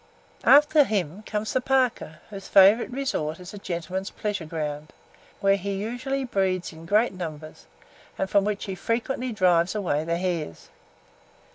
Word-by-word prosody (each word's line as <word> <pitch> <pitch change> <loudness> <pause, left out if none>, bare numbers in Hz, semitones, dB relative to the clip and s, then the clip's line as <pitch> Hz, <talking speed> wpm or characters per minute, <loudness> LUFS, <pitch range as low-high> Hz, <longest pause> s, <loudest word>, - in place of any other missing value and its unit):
After 295 +1 +7
him, 200 - -2
comes 215 0 -3
the 260 - +1
parker, 255 -11 0
whose 195 -1 -8
favourite 200 +4 +6
resort 245 - -3
is 180 +1 -10
a 205 - -8
gentleman's 185 +1 -4
pleasure 205 -6 -4
ground, 150 -1 -5 0.5
where 195 0 +4
he 200 +1 -4
usually 245 +7 -3
breeds 190 -8 -1
in 160 +1 -12
great 210 +4 +3
numbers, 155 -4 -8 0.5
and 190 - -1
from 200 +1 +3
which 205 0 -2
he 195 - -4
frequently 240 +6 -2
drives 180 -3 +2
away 170 -8 0
the 170 +1 -1
hares. 175 - -4
195 Hz, 150 wpm, -25 LUFS, 170-225 Hz, 0.5 s, After